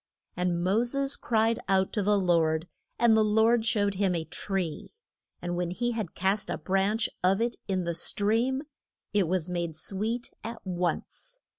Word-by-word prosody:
And 180 -1 0
Mo 195 +5 +3
ses 275 +3 0
cried 225 0 +1
out 190 -1 +2
to 210 - 0
the 205 +1 +3
Lord, 165 -3 +2 0.3
and 235 -2 +5
the 220 - +5
Lord 220 +2 +3
showed 205 -3 +2
him 190 -2 +1
a 165 -1 -2
tree, 180 - -4 0.5
and 175 0 -2
when 175 -1 -1
he 240 +7 -1
had 220 -7 -4
cast 195 +3 0
a - - -1
branch 195 +4 +1 0.2
of 190 +2 +3
it 235 +1 -1
in 190 -2 0
the 170 0 -1
stream 225 - +1 0.5
it 200 -4 +3
was 180 -1 0
made 170 -3 -3
sweet 215 +8 -3
at 230 0 -6
once. 180 - -3
195 Hz, 170 wpm, -28 LUFS, 180-225 Hz, 0.5 s, and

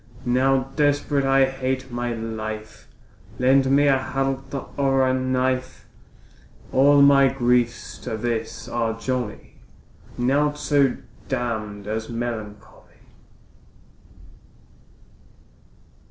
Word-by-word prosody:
Now 130 +2 +1
desperate 145 -1 +1
I 135 0 +4
hate 130 -1 -3
my 120 0 -2
life, 110 -1 -6 0.5
Lend 130 +1 +3
me 140 +2 +4
a 135 -1 +4
halter 135 0 -3
or 135 -1 +2
a 130 - +2
knife; 130 0 -1 0.9
All 140 +1 +5
my 140 -1 +6
griefs 120 -2 0
to 110 - -5
this 115 0 -3
are 115 -1 -2
jolly, 125 -3 -4 0.6
Naught 145 +4 +1
so 140 -3 +2 0.3
damn'd 110 -5 -3
as 110 +1 -4
melancholy. 115 -3 -7
130 Hz, 95 wpm, -23 LUFS, 115-135 Hz, 0.9 s, my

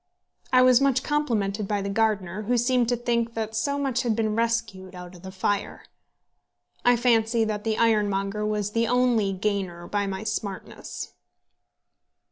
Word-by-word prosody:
I 255 0 +6
was 255 0 +6
much 270 -2 +2
complimented 215 -9 -1
by 205 -1 -1
the - - -3
gardener, 205 -3 0
who 240 +4 0
seemed 240 0 +2
to 245 - +2
think 235 -1 -1
that 220 -1 -3
so 280 +6 0
much 270 -3 0
had 235 -4 0
been 220 -1 0
rescued 225 -5 -2
out 180 0 -9
of 175 - -14
the 190 - -8
fire. 200 +2 -2 1.0
I 245 0 +5
fancy 230 -1 +2
that 210 -1 -2
the 220 -1 -1
ironmonger 210 -2 +1
was 210 -1 -1
the 230 +1 +1
only 240 -4 +2
gainer 190 -3 -2
by 205 +2 -1
my 190 +1 -4
smartness. 215 -3 -5
220 Hz, 160 wpm, -25 LUFS, 200-235 Hz, 1.0 s, I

